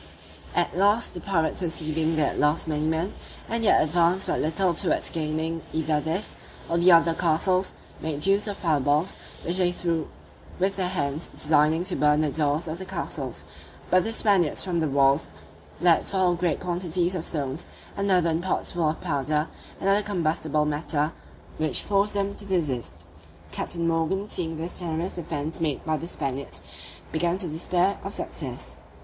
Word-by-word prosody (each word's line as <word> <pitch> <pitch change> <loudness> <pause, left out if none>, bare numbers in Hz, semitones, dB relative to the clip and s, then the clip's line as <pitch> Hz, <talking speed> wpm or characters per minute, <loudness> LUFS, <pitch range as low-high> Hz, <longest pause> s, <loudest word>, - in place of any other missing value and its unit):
At - - +2
last, 205 +5 +3
the 175 - -6
pirates 165 -5 0
perceiving 160 -2 0
they 155 - +3
had - - -1
lost 150 +3 +2
many 155 0 0
men, 160 +5 0 0.3
and 230 0 +1
yet 215 - +6
advanced 170 +4 +2
but - - 0
little 175 +3 +1
towards - - 0
gaining 160 +1 -2
either 155 -1 +1
this, 165 +7 -2 0.3
or 170 0 +1
the 180 +2 +6
other 165 0 +6
castles, 180 +3 +1 0.3
made 150 -1 -1
use 200 +2 +3
of 200 -1 -3
fire 160 -6 +1
balls, 145 +6 +1 0.3
which 175 +2 0
they 180 -1 +3
threw 170 -3 -2 0.5
with 195 +2 +1
their 190 -2 +1
hands, 155 -4 -2
designing 155 +2 +2
to 185 0 -1
burn 150 0 +3
the 150 -2 +1
doors 150 +2 0
of 160 +2 -4
the 190 - -5
castles; 160 -8 -5 0.5
but 185 0 +5
the 225 - 0
Spaniards 200 -8 +3
from 180 -3 -1
the 160 - +1
walls 140 +1 +3 0.5
let 170 0 +4
fall 185 -2 +2
great 170 -3 0
quantities 175 0 0
of 175 -3 -2
stones, 145 -1 -3 0.3
and 200 0 -1
earthen 170 -3 +3
pots 185 - -1
full 170 -3 +1
of 155 - -4
powder, 150 +3 0 0.3
and - - -2
other 200 +1 +4
combustible 165 -6 0
matter, 150 0 0 0.5
which 155 0 +1
forced 205 0 +1
them 200 0 0
to 205 - -7
desist. 135 - -2 0.5
Captain 170 -1 -2
Morgan 165 +5 0
seeing 165 -5 -3
this 165 +2 -4
generous 170 +1 -2
defence 160 -2 -4
made 150 -4 -1
by 155 -1 +1
the 165 +2 -5
Spaniards, 140 -4 -3 0.5
began 170 +2 +1
to 190 -2 -3
despair 175 +4 0
of - - -5
success. - - -6
165 Hz, 175 wpm, -26 LUFS, 155-185 Hz, 0.5 s, yet